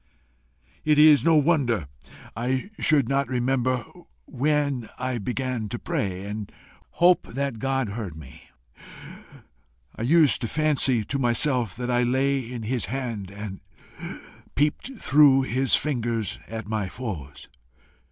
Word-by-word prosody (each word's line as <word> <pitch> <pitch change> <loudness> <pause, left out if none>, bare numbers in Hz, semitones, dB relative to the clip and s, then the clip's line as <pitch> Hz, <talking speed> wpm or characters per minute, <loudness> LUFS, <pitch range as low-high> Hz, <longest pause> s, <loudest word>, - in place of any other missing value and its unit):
It 150 -1 +3
is 150 -1 +7
no 165 -1 +4
wonder 135 - +2 0.5
I 130 - -2
should 145 -6 +3
not 140 +1 +1
remember 130 0 0 0.4
when 140 -3 -1
I 125 -1 -2
began 125 0 -3
to 120 - -3
pray, 95 -4 -3
and 105 0 -6 0.4
hope 175 0 +4
that 135 -4 -2
God 135 -3 -1
heard 100 -6 -6
me. 70 -5 -13 1.5
I - - -8
used 150 +2 +4
to 115 - -1
fancy 140 -5 +1
to 140 +6 -3
myself 125 -2 +1
that 125 +1 -3
I 120 0 +2
lay 135 +3 +1
in 120 -2 -6
his 115 -2 -1
hand 115 -4 -4
and 100 -1 -8 0.9
peeped 150 - -1
through 140 -5 +5
his 130 0 +2
fingers 120 -7 -1
at 110 0 -6
my 105 -3 -2
foes. 90 - -7
125 Hz, 130 wpm, -25 LUFS, 110-140 Hz, 1.5 s, is